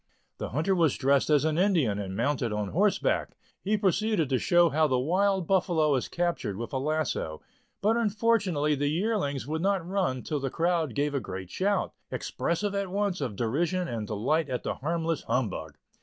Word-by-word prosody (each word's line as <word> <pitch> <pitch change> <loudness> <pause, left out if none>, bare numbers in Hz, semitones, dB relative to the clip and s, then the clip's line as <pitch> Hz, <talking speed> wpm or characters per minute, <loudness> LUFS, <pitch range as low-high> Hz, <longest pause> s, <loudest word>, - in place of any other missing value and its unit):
The - - -4
hunter 160 +9 0
was 165 -6 +2
dressed 140 +1 +2
as 150 -1 +4
an 160 +1 +1
Indian, 160 - +2
and 95 -1 -5
mounted 125 -1 0
on 105 -1 -2
horseback; 200 +4 +1 0.3
he 210 +2 +1
proceeded 200 -4 +1
to 130 -2 +2
show 175 -1 +4
how 155 +1 +2
the 130 -3 +1
wild 185 +7 +1
buffalo 170 -5 +2
is 130 - 0
captured 170 - -2
with 120 +5 -6
a 130 - 0
lasso, 145 - -2 0.4
but 215 +3 +3
unfortunately 205 -9 +1
the 145 0 0
yearlings 165 - -1
would 155 +3 -3
not 190 -2 0
run 180 -10 -1
till 150 - -2
the 135 0 -2
crowd 165 -5 0
gave 145 0 0
a 140 - +1
great 95 -6 -7
shout, 200 +2 0 0.2
expressive 195 +4 -2
at 200 -1 -2
once 200 -2 -1
of 125 -7 -3
derision 170 - 0
and 110 -3 -4
delight 135 +9 0
at 125 -1 -3
the - - -1
harmless 165 +2 -2
humbug. 80 - -2
155 Hz, 185 wpm, -28 LUFS, 130-190 Hz, 0.4 s, as